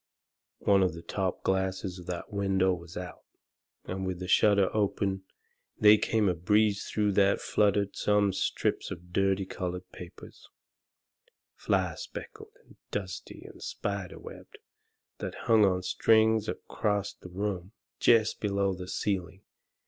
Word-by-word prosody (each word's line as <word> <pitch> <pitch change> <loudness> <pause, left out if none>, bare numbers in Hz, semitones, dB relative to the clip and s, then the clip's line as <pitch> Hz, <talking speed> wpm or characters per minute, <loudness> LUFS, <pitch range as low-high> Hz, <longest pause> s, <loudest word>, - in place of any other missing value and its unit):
One 100 -1 +4
of 90 -3 +1
the 85 - -9
top 95 -3 -2
glasses 95 -1 -1
of 90 - -12
that 90 +2 -5
window 95 -2 +2
was 85 -1 -8
out, 90 -2 -7 0.6
and 95 +1 -4
with 95 -1 -2
the 90 0 -6
shutter 100 +1 +4
open 95 -2 0 0.5
they 105 0 +7
come 110 -1 +1
a 90 - +3
breeze 105 +4 +2
through 105 -1 0
that 100 0 +3
fluttered 100 -1 +1
some 105 -1 +2
strips - - -1
of 90 +1 -9
dirty 95 0 +2
coloured 90 -1 -5
papers, 90 0 -12 1.0
fly - - 0
specked 425 - -8 0.2
and - - -20
dusty - - -6
and - - -13
spider - - -4
webbed, 435 - -12 0.6
that - - -5
hung 110 -3 +6
on 95 -1 +1
strings 110 +2 +3
acrost 100 -2 -2
the 90 - -10
room, 95 0 -3 0.3
jest 110 -2 +4
below 100 -2 0
the 90 0 -7
ceiling. 95 -1 -3
95 Hz, 140 wpm, -29 LUFS, 90-105 Hz, 1.0 s, they